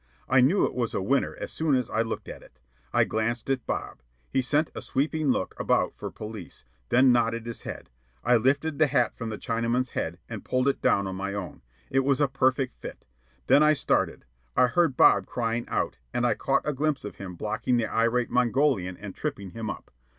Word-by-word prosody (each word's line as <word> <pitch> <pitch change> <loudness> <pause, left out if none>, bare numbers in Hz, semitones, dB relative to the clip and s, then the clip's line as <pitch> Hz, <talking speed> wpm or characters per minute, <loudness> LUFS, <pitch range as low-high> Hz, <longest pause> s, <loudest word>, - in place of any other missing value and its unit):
I 130 - +5
knew 160 +11 +4
it - - -3
was 120 -3 -2
a - - 0
winner 140 +8 +1
as - - -5
soon 155 -3 +1
as 125 -3 0
I 110 - 0
looked 115 -1 -4
at - - -8
it. 65 - -19 0.3
I - - +4
glanced 115 +4 -1
at 130 -3 -2
Bob. - - -4 0.3
He 135 - +2
sent 150 +5 +1
a - - -6
sweeping 150 +3 -1
look 125 -8 0
about - - +1
for - - -6
police, 105 - -7 0.2
then 130 +1 +5
nodded 115 -1 +1
his 120 -1 -6
head. - - -8 0.3
I 120 0 +5
lifted 140 +6 +1
the 155 - +5
hat 125 -4 +1
from 115 -2 -5
the 110 - -4
Chinaman's 115 +3 -1
head 85 +2 -3
and 110 -3 -7
pulled 130 +1 0
it 140 - +1
down 100 - +3
on 95 -1 -4
my 100 +1 -3
own. 100 -3 -6 0.3
It 135 - +3
was 135 0 +2
a 145 - +4
perfect 130 -1 0
fit. - - -9 0.4
Then 145 - +5
I 150 0 +6
started. 140 - 0 0.3
I 125 - +6
heard 155 0 +1
Bob - - +5
crying 115 -1 -2
out, - - -1 0.2
and 120 - +1
I 120 - +3
caught 135 +2 0
a 150 - +1
glimpse 145 -2 -1
of 105 - -7
him 90 -2 -7
blocking 115 +6 -1
the 115 - +1
irate 115 +2 +1
Mongolian 125 -7 +1
and 100 -2 -8
tripping 130 - -5
him 115 0 -5
up. - - -7
125 Hz, 215 wpm, -27 LUFS, 110-135 Hz, 0.4 s, I